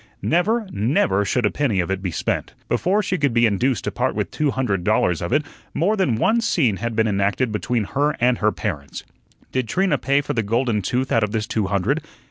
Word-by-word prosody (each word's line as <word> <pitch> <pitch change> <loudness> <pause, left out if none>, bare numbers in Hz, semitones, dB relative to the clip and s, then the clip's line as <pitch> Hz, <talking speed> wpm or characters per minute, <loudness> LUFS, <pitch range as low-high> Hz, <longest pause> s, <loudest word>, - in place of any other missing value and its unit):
Never, 215 +6 +1
never 105 -3 +1
should 115 +4 0
a 105 - +2
penny 130 -10 0
of 90 +1 -1
it 95 0 -2
be 95 - -2
spent. - - -3
Before 200 +4 +1
she 185 -2 -1
could 140 -5 +1
be 115 0 +5
induced 115 +1 +1
to - - -2
part - - -1
with - - -2
two 150 -1 0
hundred 115 -9 -1
dollars 90 -4 +1
of 85 - -3
it, 150 +2 +2 0.3
more 195 +7 +2
than 185 - +1
one 220 - +2
scene 135 - +1
had 115 +3 -3
been 110 0 +2
enacted 100 +4 0
between 110 +3 -1
her 145 +8 0
and 120 0 +2
her 105 0 +2
parents. 75 -12 -5 0.5
Did 130 -3 -1
Trina 185 - +1
pay 140 +2 +2
for - - -3
the 115 - +1
golden 115 0 0
tooth 125 +7 -1
out 115 - +3
of 105 - -2
this 110 -1 -1
two 110 -3 -1
hundred? 100 - 0
115 Hz, 225 wpm, -22 LUFS, 100-145 Hz, 0.5 s, be